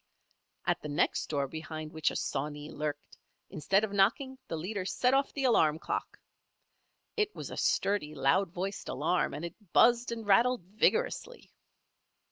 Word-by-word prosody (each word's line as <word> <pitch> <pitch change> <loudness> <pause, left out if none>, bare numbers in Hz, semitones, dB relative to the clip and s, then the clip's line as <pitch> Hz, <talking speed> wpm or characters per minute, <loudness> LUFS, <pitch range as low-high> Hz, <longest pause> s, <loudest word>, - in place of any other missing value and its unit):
At - - +1
the 150 - -6
next 145 - +1
door 140 -2 0
behind 155 +1 -7
which 155 -2 +1
a - - -7
"sawney" 145 +2 -3
lurked, 150 -1 -5 0.3
instead 195 +7 +1
of 210 -2 -2
knocking, 260 +7 +2
the - - -3
leader 185 +5 -3
set 250 +7 +1
off 275 +1 +2
the 275 - -3
alarm 160 -12 +4
clock. - - -4 1.0
It 425 -1 0
was - - -7
a - - -5
sturdy, 175 -7 0
loud 165 +8 +2
voiced 190 +3 -4
alarm, 165 +6 0
and 160 - -5
it 170 - -6 0.2
buzzed 240 0 +5
and 225 -1 -5
rattled 235 +2 +4
vigorously. 460 - -1
190 Hz, 155 wpm, -30 LUFS, 155-235 Hz, 1.0 s, buzzed